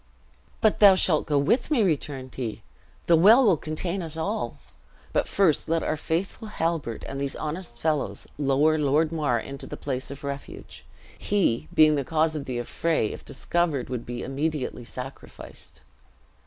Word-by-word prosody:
"But 220 - +3
thou 200 -2 +8
shalt 170 -4 +3
go 145 - +2
with 230 - +2
me," 270 -8 +3
returned 145 -7 -2
he; 115 -5 -5 0.4
"the 170 - +5
well 220 +10 +7
will 195 -5 +5
contain 170 +5 -3
us 165 -2 -7
all. 120 - -2 0.6
But - - +1
first 180 -8 +2
let 165 0 +1
our 155 - 0
faithful 175 +8 -3
Halbert 165 - -2
and 135 0 -5
these 140 -1 -2
honest 155 -4 -5
fellows 150 +2 -1
lower 145 +3 +3
Lord 150 +2 +2
Mar 145 -7 0
into 135 +3 -7
the - - -7
place 130 +1 -4
of 140 0 -9
refuge. 140 0 -7 0.3
He 165 - 0
being 155 -1 +6
the 140 -2 0
cause 160 +2 +1
of 145 - -4
the 125 -2 -4
affray, 120 0 0
if - - -9
discovered, 165 -8 -1
would 120 -2 -4
be 120 0 -5
immediately 140 -3 -3
sacrificed." 130 +3 -10
155 Hz, 165 wpm, -26 LUFS, 135-165 Hz, 0.6 s, thou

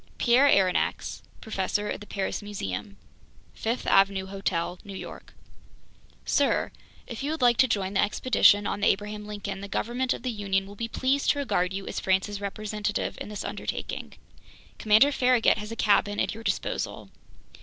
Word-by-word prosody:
Pierre 250 +3 +5
Aronnax 190 -8 +1 0.2
Professor 205 0 -2
at - - -4
the 210 - -10
Paris 195 +1 -3
Museum 200 - -5 0.6
Fifth 230 +3 -3
Avenue 195 -1 +3
Hotel 185 -3 -2
New 200 -2 -9
York - - -10 0.9
Sir: 285 - +1 0.3
If 235 - -7
you 280 - -2
would 315 -3 -2
like 240 -2 +5
to 260 - +5
join 200 -4 -1
the 195 - +3
expedition 205 -2 +4
on - - -2
the 205 - +2
Abraham 210 +1 -1
Lincoln, 200 -2 -5
the 200 - -6
government 245 +5 -1
of - - -11
the 255 - -1
Union 195 -3 -1
will 200 - -11
be 230 +3 -4
pleased 265 +4 0
to - - +3
regard 185 -10 0
you 195 0 -5
as - - -4
France's 190 +2 0
representative 210 +1 -3
in - - -5
this 210 - -5
undertaking. - - -5 0.7
Commander 220 +7 +5
Farragut 250 -5 +3
has 210 +1 -7
a - - -4
cabin 205 -1 +2
at - - 0
your 225 +1 -9
disposal. 200 -3 -3
210 Hz, 170 wpm, -27 LUFS, 195-230 Hz, 0.9 s, Pierre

